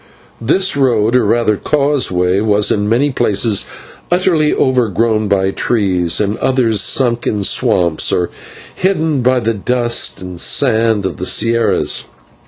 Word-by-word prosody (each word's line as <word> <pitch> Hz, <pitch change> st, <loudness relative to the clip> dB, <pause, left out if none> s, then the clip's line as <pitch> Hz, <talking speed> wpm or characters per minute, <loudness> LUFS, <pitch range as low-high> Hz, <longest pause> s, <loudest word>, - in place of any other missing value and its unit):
This 185 Hz, +11 st, +1 dB
road, 120 Hz, -4 st, +1 dB
or 125 Hz, -, +3 dB
rather 110 Hz, -1 st, +1 dB
causeway, 125 Hz, -12 st, 0 dB
was 105 Hz, -1 st, +1 dB
in 105 Hz, 0 st, -1 dB
many 135 Hz, +6 st, +1 dB
places 105 Hz, -3 st, 0 dB, 0.4 s
utterly 175 Hz, -4 st, +1 dB
overgrown 115 Hz, -3 st, 0 dB
by 95 Hz, -1 st, 0 dB
trees, 95 Hz, -7 st, 0 dB
and 105 Hz, 0 st, -1 dB
in -, -, -17 dB
others 115 Hz, -6 st, +1 dB
sunk 120 Hz, +1 st, +1 dB
in 105 Hz, -2 st, -2 dB
swamps 85 Hz, -4 st, +1 dB
or 90 Hz, -1 st, -1 dB, 0.4 s
hidden 160 Hz, -7 st, -1 dB
by 130 Hz, +1 st, +2 dB
the 115 Hz, -1 st, -1 dB
dust 120 Hz, +3 st, -1 dB
and 90 Hz, -2 st, -9 dB
sand 115 Hz, -6 st, +1 dB
of 95 Hz, -, -4 dB
the 90 Hz, -, -5 dB
/sierras 115 Hz, +3 st, +1 dB
115 Hz, 140 wpm, -14 LUFS, 100-130 Hz, 0.4 s, or